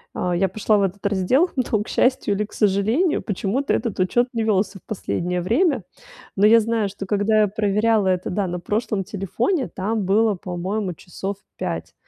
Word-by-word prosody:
А, 180 -1 -1
я 190 +3 +2
пошла 215 +2 +1
в - - +2
этот 195 +1 -3
раздел, 205 - +2
но 235 -5 0
к - - -17
счастью 250 -5 +1
или 210 +1 -1
к - - -18
сожалению, 220 - +2
почему-то 210 +7 -1
этот 230 -6 -2
учет 240 +7 +2
не 230 - -1
велся 200 -2 0
в - - -39
последнее 180 -3 -2
время. 250 - +1 0.5
Но 200 +2 +5
я 230 +2 +7
знаю, 220 -2 0
что 195 0 -7
когда 210 +2 +2
я 210 - +4
проверяла 210 +1 +1
это, 185 -1 0
да, 195 0 -1
на 180 0 -3
прошлом 210 +1 -1
телефоне, 210 - -1
там 210 +3 -2
было, 210 +3 +3
по-моему, 185 +2 -3
часов 190 +4 -6 0.2
5. - - -4
205 Hz, 185 wpm, -22 LUFS, 190-225 Hz, 0.5 s, я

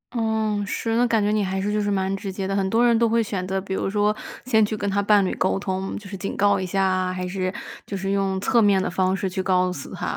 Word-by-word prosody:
嗯， 220 -2 0
是， 225 +2 -2
那 245 +1 +3
感 225 -3 +2
觉 205 - +1
你 215 -1 +1
还 190 0 -2
是 205 +2 -1
就 210 - +1
是 205 - -1
蛮 190 -1 0
直 195 0 -5
接 190 0 -4
的。 195 - -1
很 195 -1 +1
多 230 +4 +3
人 235 -1 +4
都 230 - +3
会 230 +1 +2
选 190 -3 -4
择 190 0 -1
比 190 0 -5
如 190 - -1
说 210 +1 +1 0.3
先 220 -4 +4
去 215 +1 -1
跟 205 - -3
他 200 +1 +1
伴 205 -1 +4
侣 - - -1
沟 - - +1
通， 190 -1 -3
就 205 - -10
是 195 - -7
警 195 +1 -5
告 200 0 +3
一 185 - -2
下 195 +2 0
啊， 185 -1 +1
还 185 0 -4
是 185 0 -2 0.4
就 200 - -4
是 195 +1 -2
用 195 -1 0
侧 235 +3 +3
面 200 -2 +4
的 - - -1
方 185 +1 +1
式 195 0 -2
去 190 +1 -2
告 185 -1 +1
诉 140 - -8
他。 - - -3
195 Hz, 315 characters per minute, -23 LUFS, 190-210 Hz, 0.4 s, 人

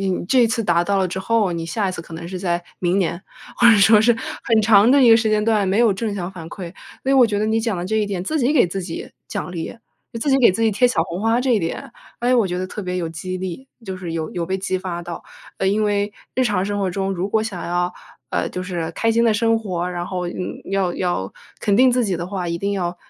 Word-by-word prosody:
嗯， 190 -2 -1
这 260 - +4
一 - - +5
次 230 0 -1
达 175 -1 +3
到 200 +1 +1
了 190 - +2
之 185 - -4
后， 210 0 +1
你 165 -1 -4
下 200 +2 -1
一 185 - -3
次 170 - -6
可 165 0 -11
能 170 +1 -7
是 185 +1 -5
在 175 -2 -1 0.2
明 180 +2 +1
年， 170 -1 -1 0.4
或 240 - +6
者 220 - +6
说 210 +1 +6
是 230 +1 +4 0.3
很 225 -2 +3
长 215 +1 +6
的 280 0 +5
一 235 - +7
个 225 - +9
时 220 -1 +1
间 215 0 +2
段 215 -3 +2
没 200 +4 +1
有 230 -4 +5
正 205 +1 -3
向 180 -1 -4
反 165 -4 -9
馈。 175 -1 -8 0.3
诶， 270 - +2
我 255 -3 +6
觉 205 -2 -2
得 210 - 0
你 220 +1 +1
讲 220 -4 -1
的 175 - -4
这 220 +4 -1
一 210 -1 +1
点， 190 -3 -3
“自 310 +9 -1
己 265 +2 +2
给 245 - +5
自 190 +3 -4
己 170 -2 -6 0.2
奖 - - -4
励， 165 +5 -5 0.4
自 280 +4 -1
己 270 - +4
给 245 - +6
自 225 - -2
己 220 - +4
贴 250 +5 +3
小 185 -9 +1
红 175 +2 -5
花” 225 +2 +2
这 265 - 0
一 - - +3
点， 165 -2 -4 0.3
诶， 245 +1 +2
我 230 -5 +3
觉 180 0 -3
得 185 - -2
特 210 - -7
别 180 -1 -3
有 170 -2 -2
激 185 +3 -5
励， 190 +8 -6 0.2
就 190 -2 -5
是 175 -3 -6
有 160 -1 -3
有 170 -2 -3
被 190 +1 -1
激 185 -1 -2
发 175 -2 -5
到。 170 0 -7 0.4
呃， 190 - 0
因 210 +2 +1
为 205 0 0 0.2
日 255 - +2
常 205 -5 +1
生 205 0 -2
活 195 - 0
中 195 +1 -2
如 185 +2 -2
果 220 +1 +1
想 190 -6 -5
要， 175 +1 0 0.4
呃， - - -1
就 180 - -5
是 170 -3 -3
开 225 +5 +1
心 230 +1 +3
地 220 -2 +3
生 225 +1 +2
活， 180 -4 -3
然 175 0 -4
后， 180 -2 -3
嗯， 180 - -6
要 190 -3 0
要 175 - -2 0.3
肯 205 -1 +2
定 255 +1 +6
自 250 0 +2
己 190 -4 -1
的 170 - -4
话， 185 -3 -3
一 170 - -1
定 200 +3 -2
要 175 -2 -2
195 Hz, 305 characters per minute, -21 LUFS, 175-220 Hz, 0.4 s, 个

